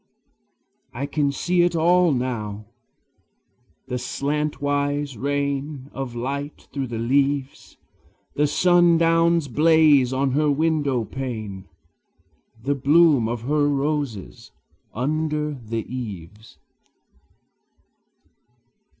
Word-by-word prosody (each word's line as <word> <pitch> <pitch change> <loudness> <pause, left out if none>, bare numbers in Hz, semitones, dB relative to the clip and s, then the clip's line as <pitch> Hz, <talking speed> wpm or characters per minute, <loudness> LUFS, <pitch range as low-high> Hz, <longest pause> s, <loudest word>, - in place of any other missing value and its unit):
I 135 +4 -3
can 145 -1 0
see 175 +5 +1
it 175 0 +2
all 175 +1 +4
now, 110 -5 -3 1.2
the 125 - -3
slantwise 145 0 -2
rain 140 +2 -3
Of 135 -3 -5
light 140 +4 -5
through 135 -2 -3
the 115 -1 -5
leaves, 135 +3 -1 0.6
The 150 +1 +2
sundown's 170 -1 +3
blaze 150 -2 +4
on 135 +1 0
her 150 +3 +2
window 145 -5 +1
pane, 110 -8 -6 0.9
The 140 - +1
bloom 145 -3 +4
of 120 -1 -4
her 145 +2 +1
roses 140 -7 -3 0.4
under 150 +3 -1
the 115 -4 -5
eaves. 105 -4 -8
140 Hz, 90 wpm, -23 LUFS, 125-150 Hz, 1.2 s, all